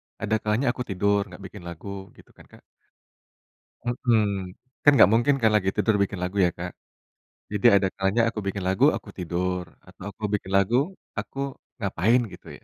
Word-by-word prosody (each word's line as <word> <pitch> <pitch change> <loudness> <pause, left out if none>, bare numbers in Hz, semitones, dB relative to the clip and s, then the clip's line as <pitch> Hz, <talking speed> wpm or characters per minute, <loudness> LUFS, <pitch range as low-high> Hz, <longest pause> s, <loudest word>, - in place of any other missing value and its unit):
ada 110 0 -1
kalanya 110 +5 +1
aku 125 -1 -5
tidur, 100 +1 +1
gak 95 +1 -12
bikin 95 -2 -10
lagu 95 +3 -7
gitu - - -19
kan, - - -19
Kak. - - -18 1.2
Hmm, 110 -6 0 0.3
kan 145 - +8
gak - - +9
mungkin 120 +5 +4
kan 110 -1 +4
lagi 95 -2 +2
tidur 110 - +2
bikin 100 -1 -4
lagu 90 +3 -3
ya, - - +3
Kak. 90 +1 -5 0.8
Jadi 105 -2 -2
ada 100 -1 +3
kalanya 95 +4 +1
aku 110 - -5
bikin 100 0 -3
lagu, 95 0 +3
aku - - -8
tidur, 90 +1 -2 0.2
atau 95 0 -14
aku 105 - -16
bikin 95 -2 -2
lagu, 100 +4 +3 0.4
aku 135 - -7 0.4
ngapain 105 +4 +2
gitu 90 - -13
ya. - - -32
100 Hz, 175 wpm, -25 LUFS, 95-110 Hz, 1.2 s, gak